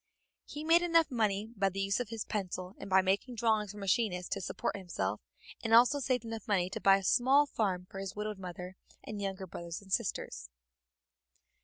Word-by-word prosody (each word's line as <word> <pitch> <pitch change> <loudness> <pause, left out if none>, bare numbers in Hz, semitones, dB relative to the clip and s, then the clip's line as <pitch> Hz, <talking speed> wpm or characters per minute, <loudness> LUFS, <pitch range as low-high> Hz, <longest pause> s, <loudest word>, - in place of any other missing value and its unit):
He 295 - -6
made 330 +2 +5
enough 330 -3 +3
money 215 -2 0
by 195 -1 +2
the 195 +1 -6
use 195 +2 +1
of 245 -4 -3
his 225 -1 -4
pencil 185 -2 -4
and - - -7
by 190 0 +5
making 200 +6 0
drawings 220 -3 +1
for 210 - -12
machinists 195 -2 0
to - - -3
support 185 - -3
himself, 105 - -3 0.4
and 225 0 +4
also 250 +5 +6
saved 250 -3 0
enough 225 -1 -6
money 185 -3 +1
to - - -5
buy 195 0 +6
a 195 - -6
small 265 +8 +4
farm 190 -9 -1
for 195 - -8
his 195 0 -5
widowed 210 -1 -4
mother 180 0 -7 0.3
and 210 -1 -6
younger 195 -1 -3
brothers 170 0 -6
and 195 -2 -8
sisters. 60 - -2
200 Hz, 195 wpm, -32 LUFS, 190-230 Hz, 0.4 s, also